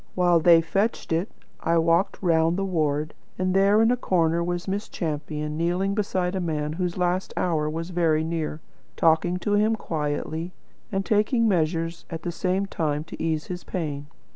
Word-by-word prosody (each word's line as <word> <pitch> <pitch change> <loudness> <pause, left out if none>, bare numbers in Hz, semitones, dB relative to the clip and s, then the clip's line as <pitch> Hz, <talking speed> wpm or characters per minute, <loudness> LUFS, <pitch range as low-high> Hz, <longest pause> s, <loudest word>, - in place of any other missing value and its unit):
While 175 -2 +4
they 165 0 +6
fetched 195 +7 -1
it, 170 +6 0 0.3
I 170 +1 +1
walked 165 +4 +2
round 165 0 +3
the 195 - 0
ward, 155 -4 0 0.2
and 185 0 0
there 200 +3 +5
in 225 - +4
a - - +3
corner 170 -7 +1
was 175 +1 -3
Miss 200 +2 -3
Champion, 150 -2 -3
kneeling 180 +4 0
beside 190 -3 -1
a 190 - -1
man 150 -3 -2
whose 180 +1 -2
last 180 +1 -1
hour 155 -4 +1
was 165 +3 -4
very 165 -3 +2
near, 160 -1 -3 0.3
talking 165 +2 +3
to 205 +3 -1
him 215 +2 +3
quietly, 160 0 -3 0.4
and 195 -1 -1
taking 225 +2 +2
measures 165 -2 0
at 165 -2 -6
the 175 - -2
same 185 +3 0
time 150 -5 -2
to - - -9
ease 160 -1 -1
his 180 -1 -6
pain. 145 -5 -4
170 Hz, 175 wpm, -25 LUFS, 160-190 Hz, 0.4 s, they